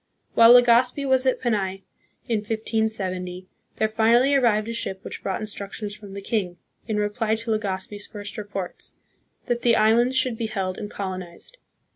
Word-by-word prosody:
While 230 +1 +8
Legazpi 245 +3 +4
was 260 0 +3
at 260 - +2
Panay, 195 -5 -1 0.4
in 230 - +1
1570, 210 -4 -2 0.3
there 220 - +1
finally 235 +5 +3
arrived 230 -6 +3
a 230 - -3
ship 190 -4 -3
which - - -7
brought 190 - -2
instructions 205 0 -5
from 205 -2 -11
the 200 - -5
king, 190 -5 -2 0.3
in 215 -2 -1
reply 215 +2 0
to 225 +1 -4
Legazpi's 205 -1 -3
first 205 -2 -7
reports, 205 -4 -5 0.5
that 240 -1 -1
the 235 -1 +4
islands 235 +4 +3
should 255 -3 +1
be 225 - -1
held 190 -4 -3
and 205 - -5
colonized. 185 - -7
215 Hz, 160 wpm, -24 LUFS, 200-235 Hz, 0.5 s, While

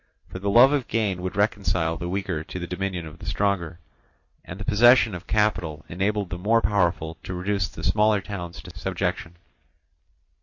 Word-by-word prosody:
For 95 - -7
the 100 +1 -2
love 125 +7 +7
of 140 -4 0
gain 100 -5 -1
would 95 0 -4
reconcile 95 -5 +1
the 85 +1 -5
weaker 95 -4 -2
to 90 - -8
the 90 - -4
dominion 90 -1 -3
of 80 - -11
the - - -10
stronger, 95 -5 -1 0.7
and 90 - -9
the 105 - -6
possession 120 0 +5
of 90 0 -8
capital 90 -8 0
enabled 100 +2 -1
the 85 - -4
more 110 +5 +3
powerful 85 -5 0
to 90 - -6
reduce 95 +1 -1
the - - -10
smaller 105 +3 +3
towns 90 -4 -7
to - - -12
subjection. 85 +1 -3
95 Hz, 180 wpm, -24 LUFS, 85-105 Hz, 0.7 s, love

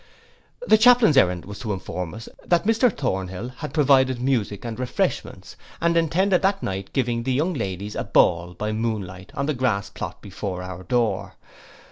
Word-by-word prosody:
The 215 - +5
chaplain's 240 - +6
errand 90 -9 +3
was 100 +1 -9
to 110 -4 -3
inform 90 -1 -5
us, 115 +1 -9 0.2
that 175 -1 +2
Mr 225 +2 +3
Thornhill 95 - -3
had - - -6
provided 130 -4 +3
music 120 -5 -1
and 115 0 -5
refreshments, 125 -1 -3 0.2
and 170 0 +2
intended 175 +3 +2
that 195 0 +1
night 95 0 -4
giving 120 -3 0
the 130 +2 -1
young 160 +8 +1
ladies 100 - -4
a - - -3
ball 85 +1 +2
by 105 0 -3
moon 110 -1 -1
light, 95 +2 -11
on 140 - -1
the 155 - 0
grass 120 -7 -1
plot - - -6
before 95 -2 -5
our 90 -1 -7
door. 120 +2 -1
120 Hz, 175 wpm, -23 LUFS, 95-145 Hz, 0.2 s, chaplain's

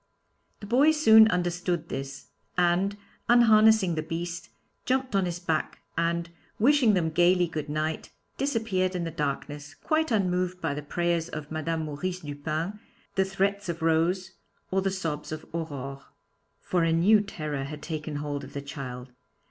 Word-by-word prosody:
The - - -7
boy 255 +8 +4
soon 220 -8 +7
understood 175 -3 -1
this, 135 0 -6 0.3
and, 180 +3 +2 0.3
unharnessing 220 -5 +6
the 155 - -1
beast, 170 +2 -5 0.3
jumped 260 -3 0
on 195 -1 +3
his 175 -1 -3
back 165 -3 -2 0.2
and, 170 +1 0 0.3
wishing 250 -2 +4
them 165 -3 +1
gaily 175 +2 +4
good 155 -3 -5
night, 155 +1 -2 0.3
disappeared 220 -9 0
in 175 - -1
the 165 - -3
darkness, 145 -1 -4
quite 315 0 0
unmoved 185 -4 0
by 145 - -1
the 150 - -4
prayers 170 +2 -1
of 150 0 -7
Madame 160 +1 -2
Maurice 175 +5 -4
Dupin, 155 +7 -4 0.3
the 190 - +2
threats 195 0 -1
of 170 -1 -4
Rose, 170 +3 +1 0.4
or 190 +1 +2
the 195 - +1
sobs 165 -7 -4
of 155 0 -6
Aurore. 140 -4 -5 0.6
For 175 -2 0
a 165 - +2
new 195 +6 +5
terror 155 -8 -4
had 150 +1 -8
taken 155 -1 -4
hold 145 -1 -3
of 135 - -10
the 140 - -4
child. 130 -2 -7
170 Hz, 155 wpm, -27 LUFS, 155-195 Hz, 0.6 s, soon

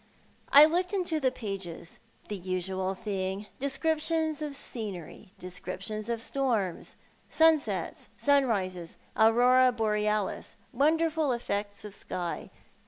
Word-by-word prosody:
I 290 +2 +10
looked 360 +5 0
into 355 -5 0
the 265 -3 +3
pages. 195 -9 -7 0.3
The 210 - -3
usual 185 +1 -2
thing! 195 -1 -3
Descriptions 315 +2 0
of 295 -2 -4
scenery, 205 - -6
descriptions 195 +4 -5
of 235 -1 -1
storms, 230 -8 -1 0.3
sunsets, 320 -2 +2
sunrises, 200 -12 +1 0.2
aurora 245 +3 +5
borealis, 210 -3 -1 0.2
wonderful 315 +2 +2
effects 205 -3 -3
of 210 - -8
sky. 175 -3 -4
225 Hz, 105 wpm, -29 LUFS, 195-285 Hz, 0.3 s, I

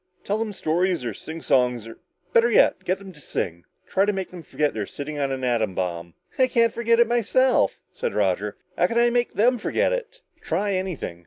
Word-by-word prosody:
Tell 205 +2 -1
them 225 -1 -2
stories 175 -4 0
or 115 - -2
sing 160 +9 -8
songs 125 -3 +2
or 115 - -11 0.3
better 230 +1 +5
yet, 200 -4 +4
get 185 +1 +1
them 195 -1 -11
to 155 - -17
sing. 85 -9 -4 0.2
Try 195 +1 +2
to 210 - +2
make 190 -2 -4
them 180 -2 -9
forget 150 -1 -1
they're 105 -2 -3
sitting 145 +1 -6
on 140 -1 0
an 130 -1 -3
atom 115 -6 0
bomb!" 85 -2 -3 0.2
"I 260 - +5
can't 230 -3 +2
forget 230 0 +2
it 235 - +7
myself," 240 +2 +2
said 485 -1 -3
Roger. - - 0 0.2
"How - - +3
can 235 - -2
I 240 0 +4
make 240 0 0
them 240 +4 +3
forget - - +1
it?" - - -5 0.2
"Try 205 0 -1
anything. 185 - -3
190 Hz, 215 wpm, -24 LUFS, -, 0.3 s, it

